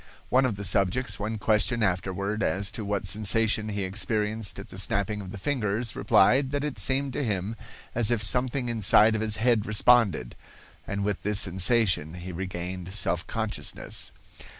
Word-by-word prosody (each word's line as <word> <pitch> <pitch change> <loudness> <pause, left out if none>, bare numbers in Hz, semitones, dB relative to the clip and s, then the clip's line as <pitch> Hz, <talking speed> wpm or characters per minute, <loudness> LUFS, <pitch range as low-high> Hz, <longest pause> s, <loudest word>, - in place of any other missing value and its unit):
One 130 +1 +4
of 110 - -3
the 100 - -7
subjects 100 +4 +1
when 110 +2 -3
questioned 110 +2 +1
afterward 95 +2 -1
as 100 0 -1
to 110 - -5
what 100 -1 -2
sensation 110 +2 +1
he 100 -1 -2
experienced 105 +2 -1
at - - -9
the - - -7
snapping 105 +1 0
of 95 - -9
the 100 - -7
fingers, 115 -2 -2
replied 130 +6 +3
that 145 +1 -2
it 145 -8 -4
seemed 135 +5 0
to 145 - -2
him 105 -1 -2 0.4
as 115 -2 +2
if 120 -3 +1
something 125 +3 +1
inside 110 -1 +4
of 110 - -1
his 110 -1 0
head 115 -1 +1
responded, 110 - +3 0.5
and 100 0 -3
with 100 -1 -2
this 105 0 +1
sensation 95 -3 +1
he 90 +1 -7
regained 90 +1 -5
self 90 -4 -1
consciousness. 110 -2 -4
105 Hz, 170 wpm, -26 LUFS, 95-115 Hz, 0.5 s, One